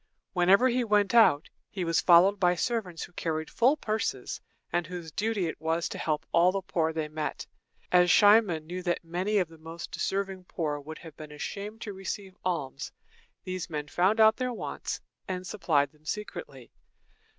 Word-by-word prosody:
Whenever 195 +7 +5
he 250 0 +1
went 210 -2 +2
out, 220 -11 +5 0.2
he 185 -3 -3
was 165 -2 +2
followed 185 +3 +6
by 180 -1 +3
servants 190 -4 -2
who - - -9
carried 160 -2 -3
full 260 +6 +3
purses, 220 -5 -3 0.3
and 175 -2 0
whose 175 -3 -7
duty 210 +2 -1
it 160 - -5
was 165 +1 0
to - - -7
help 155 0 -1
all 175 +2 +5
the 195 0 -3
poor 165 -4 0
they 160 -1 -3
met. 155 0 -4 0.5
As 180 0 +5
Cimon 205 -7 +5
knew 180 +3 -5
that 175 -1 -1
many 180 +5 -1
of 185 -4 +2
the 165 0 -16
most 165 +2 -8
deserving 195 -1 -2
poor 150 -4 -3
would 155 +2 -9
have 160 -3 -12
been 155 -1 -9
ashamed 205 +8 -6
to 205 - -5
receive 190 0 -6
alms, 145 -7 -3 0.5
these 185 -1 -4
men 150 -2 -4
found 190 +8 +2
out 220 0 +6
their 255 0 -1
wants, 235 - -5 0.3
and 185 -1 -4
supplied 155 -8 +1
them 155 -1 -27
secretly. 160 - -6
180 Hz, 180 wpm, -28 LUFS, 160-200 Hz, 0.5 s, followed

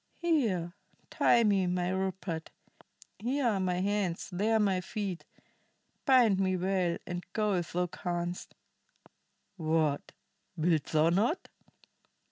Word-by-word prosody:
"Here, 225 - 0 0.4
tie 235 - +4
me, 200 -4 +3
my 180 0 0
Rupert. 190 -3 -3 0.7
Here 255 +5 -1
are 215 -5 +2
my 180 -1 0
hands; 195 -3 -1
there 215 +5 +1
my 195 -3 +2
feet. 195 -2 -4 0.8
Bind 245 -8 +5
me 185 -1 +1
well, 180 -2 0
and 175 0 -4
go 210 -2 +1
if 175 -3 -2
thou 180 +1 +1
canst. 175 0 -4 1.0
What, 155 -3 0 0.5
wilt 160 -2 +2
thou 155 +1 +3
not? 220 - +1
185 Hz, 115 wpm, -30 LUFS, 175-210 Hz, 1.0 s, Bind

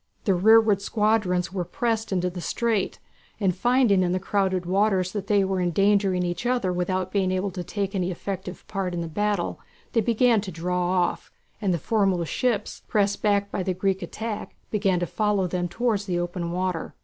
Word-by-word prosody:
The 195 - +3
rearward 215 +2 +5
squadrons 210 -4 +1
had 180 -2 -4
pressed 225 -5 -1
into 180 -1 0
the 175 0 -6
strait, 225 +1 -1 0.4
and 190 -4 +1
finding 240 -2 +3
that 185 - +2
in - - 0
the 185 - 0
crowded 190 -2 0
waters 190 0 +2
they 205 0 +1
were 190 -1 0
endangering 195 +1 +2
each 175 +7 -2
other 245 -8 +1
without 185 +1 -1
being 195 -2 +1
able 185 +1 -1
to 180 0 -5
take 195 +2 -3
any 185 -2 0
effective 190 +1 -5
part 190 -3 -3
in 170 - -2
the 165 - -3
battle 205 +2 -1 0.3
they 230 - +2
began 230 0 +3
to 195 -2 -6
draw 180 +1 -1
off, 180 -1 0 0.3
and 200 -3 +1
the 175 - +1
foremost 190 -2 0
ships, 230 -5 -1
pressed 205 -1 +1
back 200 -1 +1
by - - -2
the 185 0 -1
Greek 190 +1 0
attack, 210 +4 -5 0.2
began 195 -4 +1
to 175 - 0
follow 210 0 0
them 180 0 -1
towards 210 +2 -1
the 180 -2 0
open 175 0 -3
water. 180 -2 -2
190 Hz, 190 wpm, -25 LUFS, 180-210 Hz, 0.4 s, rearward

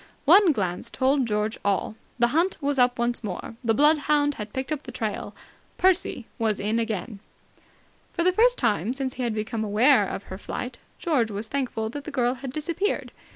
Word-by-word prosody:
One 360 +4 +7
glance 185 -9 -2
told 265 -1 +1
George 210 +1 -1
all. 200 +2 0 0.2
The 240 -1 +3
hunt 335 +7 +1
was 285 -2 0
up 245 0 +4
once 240 0 -1
more. 205 +2 -5
The 225 -2 +2
bloodhound 295 0 +3
had 210 0 -6
picked 260 +5 -4
up 300 -2 -1
the - - -9
trail. - - -4 0.4
Percy 370 -9 +2
was 220 -3 0
in 215 +3 0
again! 220 -1 -3 0.9
For 340 - -1
the 365 +1 +3
first 485 +5 +4
time 225 -1 0
since 265 -2 -3
he - - -6
had 235 -3 -1
become 220 +1 -2
aware 215 +1 +4
of 195 - -5
her 190 - -8
flight, 250 +4 -6 0.2
George 280 -10 +1
was 210 +1 -4
thankful 240 -4 -2
that 285 +2 -7
the - - -5
girl 250 -4 +1
had 265 0 -7
disappeared. 335 +8 -2
250 Hz, 190 wpm, -25 LUFS, 220-290 Hz, 0.9 s, One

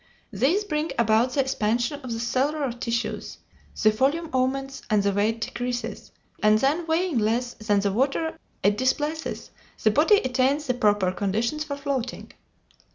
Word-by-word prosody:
These 280 - +2
bring 310 -4 -2
about 230 +2 +3
the 275 - +3
expansion 245 +1 0
of 255 -3 -7
the 225 - -3
cellular 270 +4 0
tissues, 235 -1 -3 0.5
the 215 - +6
volume 285 +9 0
augments 270 +1 -1
and 210 -2 +3
the 200 - +2
weight 215 +3 0
decreases, 240 -1 -4 0.3
and 215 0 +5
then, 295 +8 +1
weighing 325 -4 +1
less 235 +3 0
than 210 -2 0
the 200 -1 0
water 275 +7 0 0.3
it 205 +2 +3
displaces, 295 +5 -1 0.3
the 215 - +5
body 310 - +5
attains 265 +1 +1
the 255 - +1
proper 205 -5 +2
conditions 220 +10 -1
for 285 -2 -4
floating. 275 -3 -4
250 Hz, 155 wpm, -25 LUFS, 220-285 Hz, 0.5 s, the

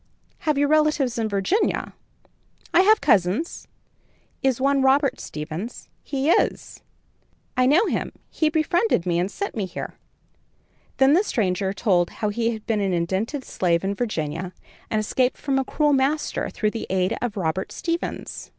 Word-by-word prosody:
"Have 300 - +2
you 285 - +3
relatives 300 -5 +2
in 220 -1 0
Virginia?" 200 - 0 0.8
"I - - +6
have 430 +3 +5
cousins." 215 - +1 0.7
"Is 265 -2 +1
one 275 +1 +2
Robert 270 0 +3
Stevens?" 155 +10 -6
"He 275 0 -2
is." - - 0 0.7
"I 255 0 +3
know 325 +11 +5
him, - - -2 0.2
he 315 - +1
befriended 315 - +1
me 170 -1 +1
and 180 +2 0
sent 400 - -4
me 205 -4 -2
here." 180 - -6 1.0
Then 270 +1 +5
the 365 +6 +4
stranger 190 - 0
told 185 -4 +1
how 210 - -3
he 230 +2 0
had 220 -1 -8
been 215 -2 0
an 195 -2 0
indented 190 - -1
slave 170 -2 0
in 195 +1 0
Virginia, 185 -5 -3 0.4
and 215 - +1
escaped 250 +4 0
from 270 -2 0
a - - +1
cruel 295 +2 +1
master 280 +3 0
through 215 -1 -1
the 225 - -5
aid 190 +3 +1
of 235 -4 -3
Robert 185 +1 -2
Stevens. 335 0 -4
235 Hz, 160 wpm, -23 LUFS, 190-285 Hz, 1.0 s, I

